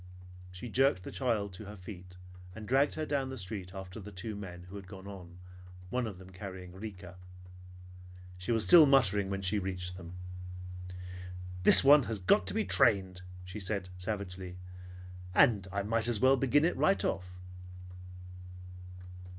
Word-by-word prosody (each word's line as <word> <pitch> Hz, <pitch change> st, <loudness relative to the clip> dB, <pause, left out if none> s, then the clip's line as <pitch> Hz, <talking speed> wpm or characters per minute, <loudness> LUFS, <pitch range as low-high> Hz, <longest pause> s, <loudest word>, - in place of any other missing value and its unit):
She 90 Hz, +7 st, -8 dB
jerked 130 Hz, -5 st, +2 dB
the -, -, -7 dB
child 110 Hz, -7 st, -1 dB
to 105 Hz, +4 st, -9 dB
her 105 Hz, +1 st, -9 dB
feet 90 Hz, -1 st, -11 dB, 0.4 s
and 110 Hz, -1 st, -8 dB
dragged 135 Hz, +4 st, +2 dB
her 155 Hz, -, -3 dB
down 140 Hz, -3 st, -1 dB
the 130 Hz, -, -6 dB
street 95 Hz, -2 st, -5 dB
after 95 Hz, +1 st, -8 dB
the 105 Hz, 0 st, -9 dB
two 105 Hz, +3 st, -5 dB
men 90 Hz, -4 st, -8 dB
who 90 Hz, +3 st, -12 dB
had 100 Hz, -2 st, -9 dB
gone 95 Hz, -1 st, -11 dB
on, 90 Hz, -3 st, -10 dB, 0.5 s
one 125 Hz, -2 st, -1 dB
of 100 Hz, -4 st, -7 dB
them 95 Hz, 0 st, -13 dB
carrying 95 Hz, -1 st, -9 dB
Rika. 95 Hz, -3 st, -9 dB, 1.2 s
She 90 Hz, +6 st, -3 dB
was 115 Hz, -2 st, +3 dB
still 165 Hz, -4 st, +9 dB
muttering 105 Hz, -8 st, +3 dB
when 95 Hz, 0 st, -3 dB
she 95 Hz, +3 st, +1 dB
reached 90 Hz, -1 st, -4 dB
them. 90 Hz, -1 st, -10 dB, 1.5 s
"This -, -, +10 dB
one 145 Hz, -1 st, +7 dB
has 110 Hz, -, -2 dB
got 95 Hz, -, +2 dB
to -, -, 0 dB
be -, -, 0 dB
trained," 95 Hz, -2 st, +3 dB, 0.2 s
she 90 Hz, +3 st, -7 dB
said 95 Hz, -2 st, -3 dB
savagely; 95 Hz, -2 st, -5 dB, 0.8 s
"and 100 Hz, -5 st, +4 dB
I 100 Hz, 0 st, -2 dB
might 115 Hz, +2 st, 0 dB
as 120 Hz, -3 st, 0 dB
well 130 Hz, +3 st, +5 dB
begin 135 Hz, +4 st, +2 dB
it 175 Hz, -, +1 dB
right 195 Hz, -, +2 dB
off." 90 Hz, -1 st, -2 dB
100 Hz, 165 wpm, -31 LUFS, 90-115 Hz, 1.5 s, This